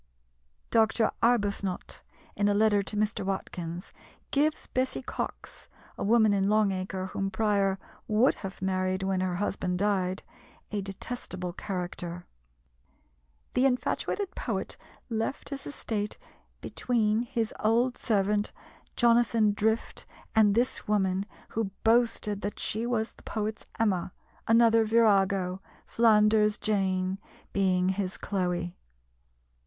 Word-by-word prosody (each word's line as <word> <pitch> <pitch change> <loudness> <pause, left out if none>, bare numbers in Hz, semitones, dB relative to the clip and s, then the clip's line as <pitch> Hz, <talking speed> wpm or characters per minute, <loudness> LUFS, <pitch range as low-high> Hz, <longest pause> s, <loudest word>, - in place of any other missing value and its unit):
Dr. 220 0 +3
Arbuthnot, 205 -5 0 0.3
in 205 - +2
a 205 - +3
letter 210 -1 +4
to 210 +2 -5
Mr. 210 -1 0
Watkins, 180 -2 -4 0.4
gives 300 +2 +1
Bessy 260 +1 -1
Cox - - -6 0.3
a - - -4
woman 220 0 +4
in 195 0 +2
Long 215 -1 +3
Acre 185 0 -3
whom 195 0 -1
Prior 195 -1 +1 0.3
would 220 +5 +4
have 190 -1 -7
married 185 0 0
when 190 -1 0
her 185 -1 -1
husband 185 -1 -1
died 190 -1 0 0.5
a 205 -1 -1
detestable 190 -2 -5
character. 175 -2 -5 1.3
The 260 +2 +4
infatuated 365 +9 -1
poet - - -3 0.3
left 225 +3 -3
his 275 -1 -6
estate 215 -7 -3 0.4
between 220 -3 +1
his 230 -2 -2
old 235 +4 +2
servant 205 -1 +1 0.4
Jonathan 230 -3 +4
Drift, 220 +2 -1 0.3
and 210 -2 +5
this 245 +2 0
woman, 195 -1 +1 0.2
who 225 -3 -1
boasted 225 -3 +2
that 205 - -4
she 225 +3 -1
was 225 -2 0
the - - -20
poet's 215 0 -4
Emma, 190 -5 +1 0.3
another 230 0 +5
virago, 195 -4 +3 0.2
Flanders 215 -2 +4
Jane, 190 -2 0 0.3
being 185 -2 +2
his 190 -1 -2
Chloe. 180 -3 -2
205 Hz, 115 wpm, -28 LUFS, 190-225 Hz, 1.3 s, and